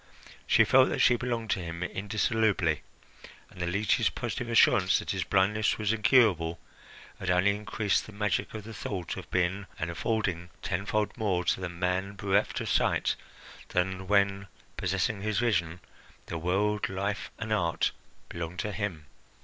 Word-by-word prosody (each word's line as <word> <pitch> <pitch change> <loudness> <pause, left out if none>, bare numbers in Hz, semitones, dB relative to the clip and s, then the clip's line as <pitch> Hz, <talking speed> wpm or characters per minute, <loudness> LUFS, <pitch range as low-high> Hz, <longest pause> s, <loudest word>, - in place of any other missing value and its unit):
She - - +6
felt - - +5
that - - -1
she 120 - +5
belonged 120 -3 -2
to - - +1
him 85 0 -5
indissolubly, 105 -4 0 0.7
and 90 - -10
the 85 - -1
leech's 100 +3 +2
positive 120 -2 -4
assurance 110 -5 +5
that - - -3
his 95 -2 -1
blindness 105 +4 +2
was 110 0 0
incurable 105 -8 +3 0.6
had 95 - -3
only 90 +3 +4
increased 105 0 -1
the - - -10
magic 105 0 -1
of 110 - -6
the 110 +2 -9
thought 95 -6 -4
of - - -9
being 95 +2 0
and 85 -3 -3
affording 90 -2 -1
tenfold 100 +3 -1
more 95 -5 +1
to - - +1
the 90 - -3
man 90 +3 -2
bereft 100 +1 +1
of - - -3
sight - - +2 0.5
than 95 +1 -1
when, 100 -1 +2 0.3
possessing 95 +3 -1
his 110 0 -1
vision, 90 -8 +1 0.5
the 85 - -5
world, 100 +5 0
life, 100 +6 -3
and 110 -1 -3
art 85 -5 +1 0.4
belonged 85 +1 -6
to 105 +4 -2
him. 95 -7 -4
100 Hz, 155 wpm, -29 LUFS, 90-105 Hz, 0.7 s, She